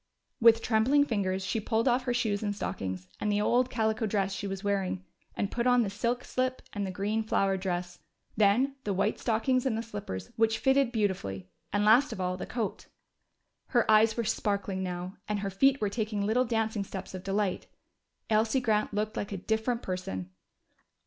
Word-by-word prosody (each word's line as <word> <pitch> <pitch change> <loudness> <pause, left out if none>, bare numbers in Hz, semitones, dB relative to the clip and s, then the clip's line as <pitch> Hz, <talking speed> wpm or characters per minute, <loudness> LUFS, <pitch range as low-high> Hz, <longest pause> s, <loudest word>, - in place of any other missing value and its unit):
With 230 0 +6
trembling 250 +6 +3
fingers 195 -6 -1
she 225 - -1
pulled 225 +3 0
off 250 +1 +2
her 245 - +1
shoes 215 -4 0
and 205 -2 -2
stockings, 95 - -4
and 210 - 0
the 205 - +1
old 245 +4 +2
calico 220 -1 0
dress 195 -2 0
she 200 - -4
was 195 0 -5
wearing, 195 -2 -1 0.3
and 200 - -2
put 235 +1 0
on 245 -1 +5
the 200 - -3
silk 235 +4 -1
slip 255 0 -2
and 205 -2 -2
the - - -4
green 205 +4 -1
flowered 195 -3 +1
dress. 175 -1 -3 0.4
Then 235 +7 +3
the 200 -2 -1
white 200 +3 0
stockings 250 +3 +1
and 250 -5 0
the 225 - -2
slippers, 195 - -6
which 225 0 +3
fitted 265 -1 +3
beautifully. 140 - -2 0.2
And 205 +1 +1
last 245 +7 +5
of - - -6
all, 180 0 -1
the 185 - -6
coat. 225 -5 -3 0.8
Her 240 -3 +2
eyes 220 +1 +5
were 235 - +1
sparkling 200 -3 -1
now, 180 0 -4
and 210 -1 -1
her 200 -1 -2
feet 270 +8 +3
were 210 - +1
taking 210 -1 -2
little 240 +5 +2
dancing 220 -3 0
steps 190 -1 -7
of 185 -1 -6
delight. 195 -1 -1 0.6
Elsie 220 +4 +2
Grant 215 -4 0
looked 215 +1 -1
like 205 - -3
a 200 - -3
different 220 +5 -1
person! 95 - -4
210 Hz, 190 wpm, -29 LUFS, 195-230 Hz, 0.8 s, With